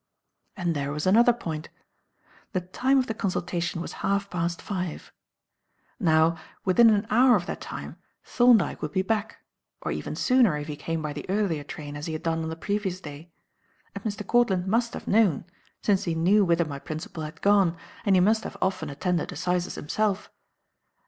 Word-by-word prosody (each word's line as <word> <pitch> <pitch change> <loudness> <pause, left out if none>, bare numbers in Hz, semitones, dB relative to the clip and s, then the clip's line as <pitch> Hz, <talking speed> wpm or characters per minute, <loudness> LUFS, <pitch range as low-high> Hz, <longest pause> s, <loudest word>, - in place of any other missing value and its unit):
And 175 -3 -1
there 140 0 -2
was 150 +1 -3
another 230 +6 +6
point. 165 -9 -5 0.8
The 185 - 0
time 255 +10 +1
of 260 - +3
the 225 - -3
consultation 180 -3 -2
was - - -6
half 200 0 0
past 170 -1 -1
five. 180 -5 -5 0.9
Now 165 -3 +3 0.3
within 225 +5 +6
an 210 -1 +2
hour 245 +2 +6
of 175 -4 -1
that - - -5
time - - -7 0.3
Thorndyke 240 -6 +3
would 150 -1 -4
be 190 - +1
back 215 +1 -2 0.4
or - - -4
even - - -4
sooner 250 - +3
if 145 - -5
he 150 - -4
came 165 +1 -3
by 150 -1 -3
the 150 - -8
earlier 190 -7 0
train 145 0 -8
as 145 +2 -5
he 160 - -3
had 155 +1 -5
done 165 -1 0
on 160 - -3
the 160 - -4
previous 190 +1 -2
day 155 0 -10 0.6
as - - -5
Mr. 210 -2 -4
Courtland 215 -7 +2
must 230 +4 0
have - - -8
known, 205 -8 +3 0.4
since 200 -3 +2
he 170 -2 -1
knew 190 +6 +4
whither 170 -2 +2
my 140 -2 -6
principal 155 +2 -6
had 155 +1 -7
gone, 195 -4 +4 0.3
and 200 -2 +3
he - - +5
must 220 +4 +3
have - - -7
often 185 -5 -1
attended 165 +4 -1
assizes 180 +2 -1
himself. 205 +6 -1
180 Hz, 185 wpm, -26 LUFS, 160-210 Hz, 0.9 s, another